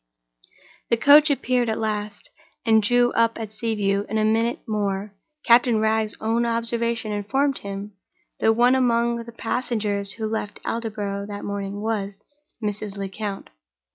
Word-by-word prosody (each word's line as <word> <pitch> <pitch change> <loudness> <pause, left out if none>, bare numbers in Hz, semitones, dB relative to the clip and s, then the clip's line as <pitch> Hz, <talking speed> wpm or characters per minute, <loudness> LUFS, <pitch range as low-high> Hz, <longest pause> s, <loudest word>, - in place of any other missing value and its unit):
The 235 - +3
coach 290 +5 +7
appeared 250 -4 +1
at 220 - -1
last, 210 -1 -4 0.3
and 220 -1 +5
drew 245 +2 +3
up 230 0 +2
at 220 -2 -6
Sea 225 0 -2
View. 200 -1 0
In 220 - -1
a 215 - +2
minute 225 +2 +1
more, 205 -1 -2 0.3
Captain 235 -1 +5
Wragge's 220 0 0
own 225 +2 +1
observation 230 -1 -1
informed 265 +7 0
him 200 +1 -6 0.5
that 225 - +4
one 245 +2 +5
among 235 -2 +1
the 235 - -10
passengers 215 -4 -1
who 220 - -4
left 215 -1 -4
Aldborough 205 -3 -3
that 205 -1 -6
morning 200 0 -4
was—Mrs. 210 0 -5
Lecount. 200 +1 -5
220 Hz, 140 wpm, -23 LUFS, 205-235 Hz, 0.5 s, coach